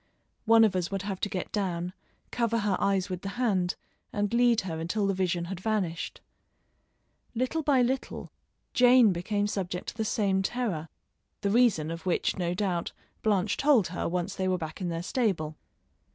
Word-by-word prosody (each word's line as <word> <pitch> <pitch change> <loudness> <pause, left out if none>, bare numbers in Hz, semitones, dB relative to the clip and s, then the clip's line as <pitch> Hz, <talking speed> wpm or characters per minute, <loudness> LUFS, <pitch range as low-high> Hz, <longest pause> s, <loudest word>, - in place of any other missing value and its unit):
One 225 0 +7
of 210 -4 +3
us 180 -1 0
would 195 -1 -3
have 195 -2 -4
to 205 - -1
get 185 -2 -4
down, 180 -3 -2 0.4
cover 230 -1 +1
her 205 -2 +1
eyes 195 -1 +1
with 185 -2 -5
the 195 +4 -6
hand 195 -8 +1 0.4
and 205 +1 -1
lead 240 -1 +4
her 165 -4 -4
until 185 +6 -1
the 195 - +1
vision 180 -2 0
had 180 0 -5
vanished. 190 -5 -2 1.1
Little 255 +7 0
by 280 -4 +3
little 260 +2 -3 0.4
Jane 245 -4 +6
became 205 +4 -1
subject 185 -3 -3
to - - -10
the 220 - -1
same 200 -3 +1
terror, 190 -8 -2 0.5
the 200 - 0
reason 205 -10 +3
of 165 +2 -6
which, 180 - +1
no 175 -2 -1
doubt, 180 -4 -1 0.3
Blanche 205 -1 +1
told 275 - +4
her 175 - -2
once 175 0 -2
they 190 - -2
were 185 0 +1
back 160 +1 -6
in 180 - -1
their 165 0 -3
stable. 180 -9 -1
195 Hz, 180 wpm, -28 LUFS, 180-225 Hz, 1.1 s, One